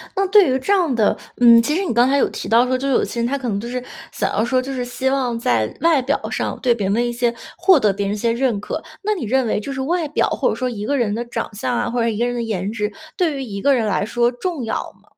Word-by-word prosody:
那 390 - +1
对 400 -6 +6
于 260 - +2
这 265 +10 0
样 345 -9 +2
的 215 -3 +2 0.2
嗯， 235 -1 +8
其 300 +6 -1
实 385 +3 0
你 290 - -1
刚 240 +3 +4
才 280 - +3
有 - - +3
提 - - -6
到 235 +3 +5
说， 255 - 0
就 270 +2 -2
是 270 - +1
有 - - +3
些 235 - -4
人 235 - +1
他 280 +3 -1
可 260 - -5
能 200 -3 -1
就 235 - -6
是 250 0 -4 0.3
想 - - -2
要 215 - +1
说 255 +2 +1
就 270 +2 -4
是 255 -2 -2
希 255 +2 -2
望 255 -4 0
在 115 - 0
外 325 -4 +4
表 275 +3 0
上 - - -2
对 250 -2 +3
别 205 -5 -2
人 230 +4 +1
一 - - -2
些 240 0 +1 0.2
获 355 -1 +5
得 210 -5 +2
别 200 +1 -2
人 205 - -1
一 - - -5
些 230 +2 0
认 235 -4 0
可。 305 +9 -5 0.2
那 425 - +1
你 360 - -4
认 260 +4 +1
为 215 - 0
就 275 +6 -6
是 270 - -5
外 335 +3 -1
表， 295 - +1
或 - - +1
者 - - -1
说 255 - -2
一 220 -5 -5
个 280 +6 0
人 225 -5 0
的 235 +3 -2
长 235 -2 -5
相 240 +4 -2
啊， - - -1
或 245 - -2
者 230 - +2
说 - - +2
一 - - -4
个 235 - +1
人 245 - -1
的 240 - -2
颜 210 -3 -2
值， 210 -2 -2 0.2
对 330 -5 0
于 270 - -4
一 200 -5 -6
个 280 +3 +4
人 230 -3 0
来 195 -2 0
说 240 +3 +1
重 310 +2 -4
要 225 - -2 0.3
吗？ - - -28
245 Hz, 345 characters per minute, -20 LUFS, 225-275 Hz, 0.3 s, 嗯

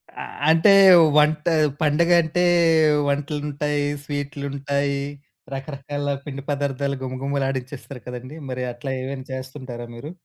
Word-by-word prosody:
ఆహ్, - - -6 0.2
అంటే 165 +5 +5 0.5
వంట 150 0 +3 0.4
పండగంటే 170 +2 +3 0.6
వంటలుంటాయి, 145 0 -1 0.2
స్వీట్లుంటాయి. 140 -1 -3 0.5
రకరకాల 145 +1 -5 0.2
పిండి 140 -2 -6
పదార్థాలు 140 -1 -1
గుమగుమలాడించేస్తారు 135 0 -4
కదండీ! 125 +3 -7
మరి 125 0 -3
అట్లా 120 +3 -6
ఏమైనా 130 0 -6
చేస్తుంటారా 130 -2 -7
మీరు? 140 +7 -8
140 Hz, 95 wpm, -22 LUFS, 135-150 Hz, 0.6 s, అంటే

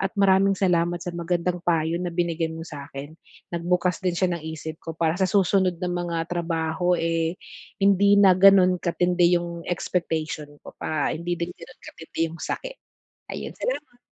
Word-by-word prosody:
at 195 - +1
maraming 195 0 +4
salamat 175 -2 +2
sa 175 - -4
magandang 175 +1 -1
payo 165 0 +1
na 180 - -2
binigay 170 -1 -1
mo 160 0 -7
sa'kin. 145 -2 -8 0.4
Nagbukas 180 +1 0
din 180 -2 0
siya 180 0 +1
ng 170 - -5
isip 160 0 -7
ko 165 -1 -7
para 160 -1 +2
sa 190 - +3
susunod 190 -2 +2
na 180 0 -2
mga 175 -1 -2 0.2
trabaho 170 +1 0
eh, 165 +1 -1 0.4
hindi 200 +1 +4
na 195 -2 +7
gano'n 185 -1 +6
katindi 175 0 +2
'yong 170 -1 -5
expectation 160 -4 -2 0.2
ko - - -10
pa, 155 -2 -1
hindi 175 +2 -3
din 170 +1 -4
gano'n 170 - -14
katindi 160 - -11
'yong 165 0 -10
sakit. - - -4 0.6
Ayon, - - -5
salamat. 295 - -4
175 Hz, 165 wpm, -24 LUFS, 165-185 Hz, 0.6 s, na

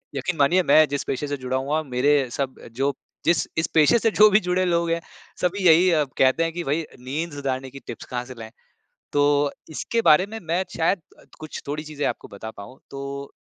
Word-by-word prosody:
यकीन 150 +6 -2
मानिए 175 +7 +4
मैं 155 0 +7
जिस 145 0 -2
पेशे 145 +3 -3
से 145 0 -3
जुड़ा 130 0 -2
हुआ 145 +4 -1
मेरे 135 0 +2
सब 135 +1 -3 0.2
जो 135 +4 0 0.3
जिस 170 +1 +2
इस 160 - +1
पेशे 155 +9 +6
से 225 - +2
जो 215 0 +7
भी 195 - +6
जुड़े 180 +1 0
लोग 170 -1 +1
हैं 170 - +1 0.4
सभी 185 +2 0
यही 170 +3 +6 0.3
कहते 135 +5 +3
हैं 165 - -1
कि 175 - -4
भाई, 155 +2 -1 0.2
नींद 150 +7 -4
सुधारने 135 -2 -3
की 135 +1 -11
टिप्स - - -7
कहाँ 125 -1 -4
से 130 - -9
लाएँ? 110 0 -9 0.6
तो 145 0 +3 0.2
इसके 230 +9 -2
बारे 155 +5 +6
में 225 +1 -7
मैं 170 +3 0
शायद 170 +3 +1 0.2
अ, - - -18 0.2
कुछ 155 -1 -7
थोड़ी 150 +2 -3
चीज़ें 150 -1 -4
आपको - - -4
बता 110 +2 -8
पाऊँ। 110 +5 -12
तो 140 0 -6
145 Hz, 210 wpm, -23 LUFS, 135-170 Hz, 0.6 s, मैं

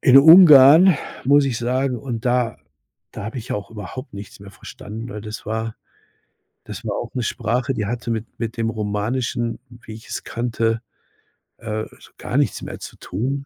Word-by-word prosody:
in 130 +1 +7
Ungarn, 160 +1 +8 0.3
muss 145 +2 +5
ich 130 -4 -2
sagen 125 +2 -1
und 120 -1 -6
da 125 -2 +1 0.6
da - - -7
habe 110 +5 -6
ich 115 - -6
auch 105 - -5
überhaupt 115 +4 -8
nichts 100 0 -10
mehr 100 -1 -11
verstanden, 110 +3 -9
weil 105 -3 -7
das 105 +1 -8
war 110 0 -3 0.9
das - - -9
war - - -2
auch - - -6
'ne 125 - -2
Sprache, 120 +4 -1
die 105 -4 -2
hatte 120 +2 -4
mit 110 -1 -2
mit 115 0 -4
dem 115 -1 -1
Romanischen, 115 +3 -2
wie 120 -2 -12
ich's 110 - -7
kannte, 115 -1 -1 0.8
äh, 110 -1 -4
so - - -17
gar - - -3
nichts - - 0
mehr - - -7
zu - - -9
tun. 135 +8 -4
115 Hz, 175 wpm, -21 LUFS, 110-130 Hz, 0.9 s, Ungarn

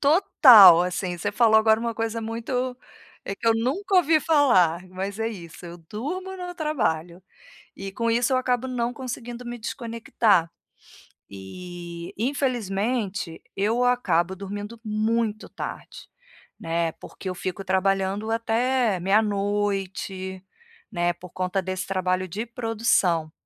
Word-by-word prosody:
Total, 255 - +8
assim, 180 0 -3
você 205 +4 -2
falou 220 0 +5
agora 220 0 +4
uma 235 0 -3
coisa 225 0 -2
muito, 245 +3 -3 0.5
eh, 195 - -4
que 230 - -7
eu 225 - +6
nunca 320 - -1
ouvi 325 -3 +5
falar, 185 - +3
mas 190 +3 -5
é 225 0 0
isso, 175 -5 -10
eu 175 0 -9
durmo 310 - -6
no 360 -1 -6
trabalho, 185 - -2 0.5
e 195 0 -7
com 230 +4 -1
isso 235 +2 +1
eu 255 - +3
acabo 250 0 0
não 245 -1 -2
conseguindo 245 -1 -7
me 240 0 -5
desconectar. 225 -6 0 0.8
E, 170 - -9
infelizmente, 220 - -2
eu 225 +5 +1
acabo 190 -8 +1
dormindo 205 +4 -7
muito 215 0 -1
tarde, - - -8 0.5
né, 165 0 -1
porque - - -11
eu 185 - -2
fico 185 +2 -4
trabalhando 195 +2 0
até 230 -1 +1
meia 195 +5 +3
noite, 195 -2 -2 0.5
né, 175 -3 +1
por 180 0 -13
conta 185 +1 -2
desse 185 0 -4
trabalho 185 -1 -1
de 210 +7 -4
produção, 225 -9 0
210 Hz, 135 wpm, -24 LUFS, 185-240 Hz, 0.8 s, Total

